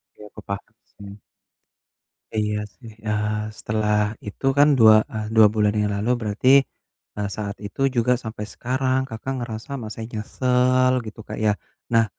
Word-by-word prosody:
Iya, 105 - -13
aku - - -12
paham 100 +2 -6 0.2
sih. 100 0 -11 1.2
Iya 105 -1 0 0.2
sih, 115 -3 -12 0.2
eee, 105 0 -1
setelah 105 -1 0 0.3
itu 105 - -7
kan 145 +1 +7
2, 110 -1 +8 0.2
eee, 110 -1 -3
2 110 -1 +8
bulan 105 -1 +2
yang 105 0 0
lalu 110 +4 -1
berarti, 110 +4 0 0.7
eee, 105 -1 -2
saat 100 -1 -5
itu 100 - -10 0.2
juga 120 +1 +2
sampai 110 -2 -5
sekarang 130 +1 0
Kakak 115 +4 -5
ngerasa 115 +2 -6
masih 110 +1 -6
nyesel 125 +3 +2
gitu 110 +1 -9
Kak 110 - -5
ya. 105 - +5 0.4
Nah, 115 -1 +5
110 Hz, 155 wpm, -23 LUFS, 105-120 Hz, 1.2 s, 2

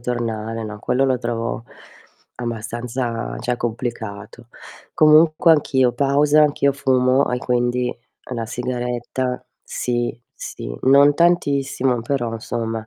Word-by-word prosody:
tornare. 115 -2 -3
No, 105 -1 -7
quello 125 +5 0
lo 130 -2 +1
trovo 115 -1 -3 0.7
abbastanza 120 0 -4
cioè 125 0 -1
complicato. 115 -1 -5 0.4
Comunque 155 +2 +5
anch'io 130 -5 +2
pausa, 145 +3 +3
anch'io 140 -1 +2
fumo 130 -1 +2
e 125 - 0
quindi 125 0 -1 0.4
la 115 -2 -3
sigaretta 125 +1 -3 0.2
sì, 120 -1 -2 0.2
sì, - - -7
non 140 +2 +6
tantissimo 140 -7 +1
però 120 -2 -2
insomma 115 0 -4
125 Hz, 105 wpm, -21 LUFS, 115-135 Hz, 0.7 s, non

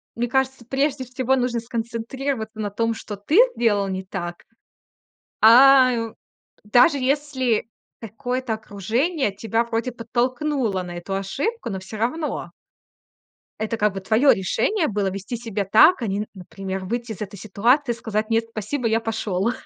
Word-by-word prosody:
мне 240 0 -2
кажется, 265 -2 0
прежде 270 +2 0
всего 255 +1 0
нужно 245 -2 0
сконцентрироваться 230 0 -4
на 205 - -2
том, 230 +3 -1
что 210 -2 -7
ты 290 - 0 0.2
сделал 205 -4 +2
не 190 0 -3
так. 175 -1 -6 1.0
А, 255 +3 +8
ю 230 -2 -3 0.5
даже 245 +8 +4
если 260 -4 0 0.3
какое-то 240 +2 -3
окружение 220 - -1
тебя 225 +2 0
вроде 235 +2 -2
подтолкнуло 245 -2 -1
на 175 0 -7
эту 195 +3 -5
ошибку, 270 - -3
но 190 -1 -4
всё 190 +3 -9
равно 300 +9 -2 1.1
это 220 +1 -2
как 210 -2 +1
бы 195 - -5
твое 225 +8 +4
решение 310 - 0
было- 200 -2 -1
вести 200 +5 -5
себя 220 -4 -3
так, 235 - +6
а 230 - -1
не, 200 +1 -1
н 215 - -3
например, 190 0 -6
выйти 235 +2 -3
из 210 - -12
этой 200 -1 -6
ситуации 240 +7 +2
и - - -10
сказать: 215 -1 -3
"Нет, 225 0 +2
спасибо, 230 +4 -2
я 225 +1 +2
пошел". 220 -2 -1
230 Hz, 155 wpm, -23 LUFS, 205-255 Hz, 1.1 s, А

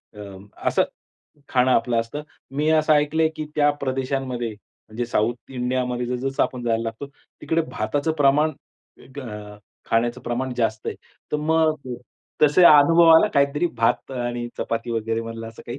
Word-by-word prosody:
अ, - - -12 0.5
असं - - +3 0.7
खाणं 130 0 +2
आपलं 120 0 +1
असतं. 115 +6 -6 0.3
मी 150 +3 -1
असं 155 -1 +3
ऐकलंय 155 +2 +2
की 155 - -3
त्या 145 -1 +4
प्रदेशांमध्ये 130 -2 -2
म्हणजे 110 +2 -8
साउथ 120 +2 -1
इंडियामध्ये 125 -1 -2
जस-जसं 130 +2 -1
आपण 125 -1 -3
जायला 115 -1 0
लागतो, 115 +5 -5 0.3
तिकडे 165 0 0
भाताचं 145 +9 -1
प्रमाण 150 +3 +4 0.7
अ, 105 -4 -8 0.3
खाण्याचं 120 +1 +1
प्रमाण 125 +2 -3
जास्त 110 -2 -1
आहे. - - -2 0.4
तर - - +2
मग 155 +1 +2 0.7
तसे 150 +4 +6
अनुभवा 165 +2 +7
आला 215 - +5
काहीतरी 140 +4 +2
भात 115 +3 +1
आणि 120 -1 -3
चपाती 115 +1 -3
वगैरे 115 0 -1
मधलं 115 0 -7
असं 115 - -13
काही? 120 +3 -6
125 Hz, 150 wpm, -23 LUFS, 115-150 Hz, 0.7 s, अनुभवा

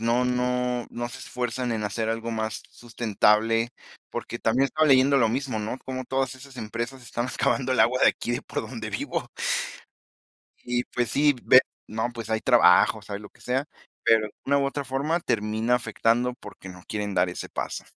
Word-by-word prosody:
no 120 +2 +2
no 125 -1 0
no 120 0 -4
se - - -9
esfuerzan 125 0 -3
en 110 -2 -1
hacer 110 +2 -2
algo 115 +1 -2
más 110 -1 -2
sustentable. 115 0 +1 0.4
Porque - - -5
también 120 +4 +3
estaba 155 +3 +2
leyendo 135 +1 +5
lo 115 -4 +4
mismo, 125 -2 -2
¿no? 110 +5 -4
cómo 130 -1 -4
todas 135 +1 -1
esas 130 0 -13
empresas 115 +4 -5
están 120 +1 -3
excavando 130 0 0
el 130 - +1
agua 130 +1 +3
de - - +8
aquí 120 - -1
de - - -2
por - - -4
donde 110 -4 -6
vivo. 100 - -3 1.3
Y 120 0 -1
pues 120 -2 -2
sí, 145 0 +4
ve 130 - +8 0.3
No, 110 +3 -2
pues, 115 -2 -7
hay 110 0 +1
trabajos, - - +4
hay 100 - -3
lo 105 - -11
que - - -25
sea, 130 +4 -1 0.4
pero 110 -1 +4
de 105 - -12
una 140 +1 +3
u 140 - +1
otra 140 0 -3
forma 145 +6 -1
termina 110 -1 0
afectando 120 +1 +1
porque 95 -6 -11
no 90 -1 -12
quieren 105 -2 -3
dar 95 - +3
ese 90 - -6
paso. - - -4
120 Hz, 190 wpm, -26 LUFS, 110-130 Hz, 1.3 s, de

